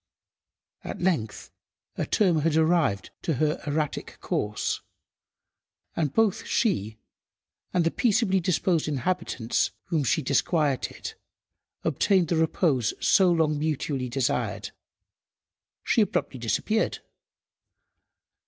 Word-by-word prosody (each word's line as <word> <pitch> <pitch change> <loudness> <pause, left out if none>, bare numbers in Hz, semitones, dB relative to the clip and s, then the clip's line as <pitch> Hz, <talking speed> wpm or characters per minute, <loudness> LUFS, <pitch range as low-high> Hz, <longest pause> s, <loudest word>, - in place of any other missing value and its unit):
At - - -6
length 155 - -1 0.4
a - - -2
term 180 -7 +3
had 155 +1 +1
arrived 160 - +2
to 160 - -1
her 155 +4 0
erratic 150 0 -2
course, 105 0 -2 1.1
and 155 -5 0
both 220 +3 +2
she 110 - 0 0.7
and 180 - +2
the 165 - +1
peaceably 205 -4 +2
disposed 175 -2 +1
inhabitants 135 -5 -1 0.2
whom 160 -4 +1
she 130 - +1
disquieted 140 0 0 0.7
obtained 185 -5 +2
the 170 - +2
repose 160 - +1
so 185 -2 +4
long 155 -3 +2
mutually 145 -4 -2
desired. 125 0 -1 1.1
She 230 - +3
abruptly 140 -9 -1
disappeared. 165 - 0
155 Hz, 100 wpm, -26 LUFS, 135-180 Hz, 1.1 s, so